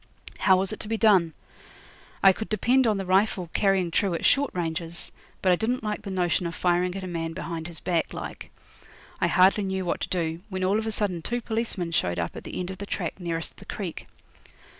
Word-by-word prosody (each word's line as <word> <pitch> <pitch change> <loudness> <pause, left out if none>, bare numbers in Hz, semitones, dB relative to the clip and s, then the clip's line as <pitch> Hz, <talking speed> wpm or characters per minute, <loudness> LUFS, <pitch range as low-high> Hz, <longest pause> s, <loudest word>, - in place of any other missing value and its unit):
How 190 -2 +5
was 190 0 0
it - - -7
to - - -4
be 225 +1 -1
done? 190 -8 +4 0.9
I 195 -1 +8
could 220 - -6
depend 245 +4 +3
on 215 -2 +2
the 195 - -3
rifle 185 -2 +2
carrying 195 -4 +2
true 185 0 +1
at - - -3
short 285 0 +4
ranges; 170 -1 -3 0.3
but 185 - +5
I - - +6
didn't 230 +6 -1
like 210 -1 -2
the 200 - -7
notion 180 -2 +1
of 170 - -5
firing 180 +1 +1
at 195 - -4
a - - -4
man 165 -2 -3
behind 165 -1 -5
his 170 -3 -9
back, 170 -3 0
like. - - -7 0.7
I - - +3
hardly 190 +3 +5
knew 190 -1 -2
what 175 - -1
to - - -2
do, 165 -2 -1
when 185 -1 -3
all 195 +3 +3
of 220 - -3
a - - 0
sudden 195 -6 0
two 240 +8 -2
policemen 220 -7 -2
showed 90 - 0
up 85 -1 -2
at - - -8
the - - -5
end 180 +1 -3
of 190 - -9
the 200 - -6
track 180 -2 -3
nearest 165 -2 -3
the - - -13
creek. 185 -6 -5
185 Hz, 225 wpm, -26 LUFS, 170-205 Hz, 0.9 s, I